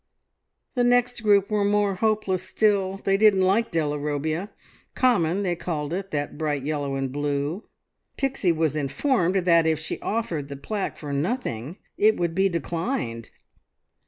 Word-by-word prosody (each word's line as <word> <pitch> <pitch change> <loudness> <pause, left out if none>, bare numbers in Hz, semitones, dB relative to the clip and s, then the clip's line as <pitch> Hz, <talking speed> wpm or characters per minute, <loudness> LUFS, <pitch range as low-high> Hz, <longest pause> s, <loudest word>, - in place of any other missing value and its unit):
The 245 - +1
next 245 0 +2
group 205 -1 +3
were 210 -1 +2
more 205 0 +2
hopeless 210 -2 0
still. 195 -3 +1
They 195 0 +1
didn't 205 -3 +5
like 205 +5 +2
Della 150 -3 -1
Robbia. 155 +6 -2 0.5
Common, 200 -7 +2
they 175 -2 0
called 160 -3 -3
it, 195 +2 -3
that 145 -1 -3
bright 145 -3 -1
yellow 145 -2 -2
and 135 -1 -2
blue. 145 - -2 0.5
Pixie 265 -9 +1
was 160 -2 0
informed 175 - +1
that 170 -2 +5
if 160 -1 +2
she 160 - -5
offered 170 -11 -2
the 140 - -6
plaque 200 +8 -4
for 145 -2 -6
nothing 150 - -2 0.2
it 215 +1 +4
would 170 -2 -1
be 190 +2 +2
declined. 165 - -3
175 Hz, 155 wpm, -25 LUFS, 150-210 Hz, 0.5 s, didn't